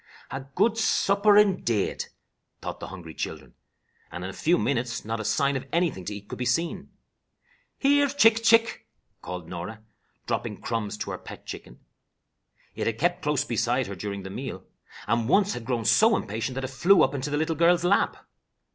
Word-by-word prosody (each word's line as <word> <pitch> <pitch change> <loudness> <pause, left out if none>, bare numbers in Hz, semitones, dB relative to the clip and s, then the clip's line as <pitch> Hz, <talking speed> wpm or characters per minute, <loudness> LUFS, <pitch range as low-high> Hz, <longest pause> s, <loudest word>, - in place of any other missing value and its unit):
"A 135 - -4
good 225 0 +2
supper, 205 -1 +4
indade," 185 - +2 0.5
thought - - -6
the - - -6
hungry 85 -4 -9
children, - - -6 0.6
and 90 - -6
in 95 - -4
a - - -12
few 170 - +2
minutes 120 -7 -1
not 115 +1 -3
a - - -3
sign 140 +5 +1
of 130 - -4
anything 165 - 0
to 105 - -4
eat 100 0 -10
could - - -7
be - - -1
seen. 165 +7 -1 0.9
"Here 285 +1 +4
chick! 230 -5 +4
chick!" 230 0 +3 0.3
called 90 -2 -6
Norah, 90 +6 -7 0.4
dropping - - -3
crumbs 110 -3 -3
to - - -4
her - - -5
pet - - -11
chicken. - - -9 0.9
It - - -3
had 115 -1 -1
kept 175 +6 +1
close 150 -2 0
beside 120 +1 0
her 100 - -6
during 100 +1 -5
the 95 - -7
meal, 100 -5 -6 0.4
and 115 +2 0
once 200 +3 +4
had 115 - -6
grown 120 -3 -1
so 220 - +5
impatient 110 +5 -4
that 135 - -3
it 130 - -3
flew 180 +8 +5
up - - +1
into 140 +1 -3
the 145 - -1
little 160 +1 0
girl's 170 +2 +4
lap. 190 +3 +1
130 Hz, 185 wpm, -26 LUFS, 105-175 Hz, 0.9 s, so